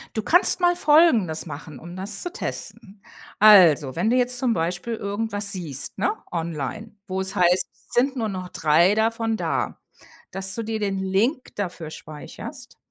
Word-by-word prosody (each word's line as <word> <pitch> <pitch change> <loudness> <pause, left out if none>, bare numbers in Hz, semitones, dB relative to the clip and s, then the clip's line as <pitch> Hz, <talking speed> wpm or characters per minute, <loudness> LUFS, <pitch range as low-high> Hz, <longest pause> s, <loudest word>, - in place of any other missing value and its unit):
Du 220 - -1
kannst 355 - +4
mal 350 0 +3
Folgendes 280 - +3
machen, 150 -2 -9
um 175 +2 -11
das 195 +2 -1
zu 355 - -5
testen. 205 - -7 0.4
Also, 170 -10 +6
wenn 190 +7 0
du 250 - +2
jetzt 250 0 +2
zum 245 -3 +1
Beispiel 175 +7 -2
irgendwas 205 0 -1
siehst, 160 -8 -4
ne, 415 - +1 0.2
online, 170 - -5
wo 190 -1 -3
es 190 0 -2
heißt: 180 +1 +2 0.2
„Sind 265 +2 +1
nur 225 -3 -2
noch 185 -2 -6
3 170 +6 +3
davon 225 0 0
da”. - - -3 0.5
Dass 190 0 +2
du 230 - -3
dir 220 0 -4
den 195 -2 -2
Link 205 +9 -1
dafür 175 -5 -5
speicherst 155 -1 -10
200 Hz, 165 wpm, -23 LUFS, 175-225 Hz, 0.5 s, Also